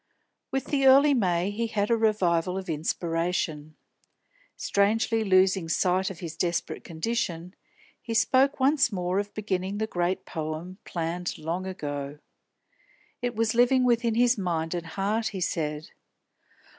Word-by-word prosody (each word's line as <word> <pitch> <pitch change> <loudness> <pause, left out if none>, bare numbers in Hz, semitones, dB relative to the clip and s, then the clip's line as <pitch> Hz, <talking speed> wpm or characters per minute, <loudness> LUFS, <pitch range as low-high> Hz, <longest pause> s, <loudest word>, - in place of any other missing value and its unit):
With 270 -1 -2
the 275 -2 +2
early 280 +2 +7
May 185 -5 +1
he 230 +3 -2
had 210 0 -1
a - - +5
revival 185 -5 +1
of 190 0 -5
inspiration. 165 -1 -2 0.8
Strangely 220 +3 +1
losing 185 -3 +3
sight 185 +3 +1
of 185 -4 -9
his 165 -2 -6
desperate 175 -1 -2
condition, 175 -1 -3 0.5
he 230 - -4
spoke 265 +4 +3
once 270 -1 +3
more 180 0 -1
of 205 0 -4
beginning 195 -1 -2
the 220 - 0
great 180 -1 -2
poem 160 +4 -5
planned 175 +1 -3
long 170 +4 -3
ago. 145 -5 -5 1.0
It 245 -1 -2
was 225 0 +1
living 245 +2 +4
within 235 -2 +2
his 240 -1 +3
mind 165 -3 -1
and 175 -1 -4
heart, 205 +6 -1
he 200 -3 -5
said. 155 -3 -2
190 Hz, 140 wpm, -27 LUFS, 170-225 Hz, 1.0 s, early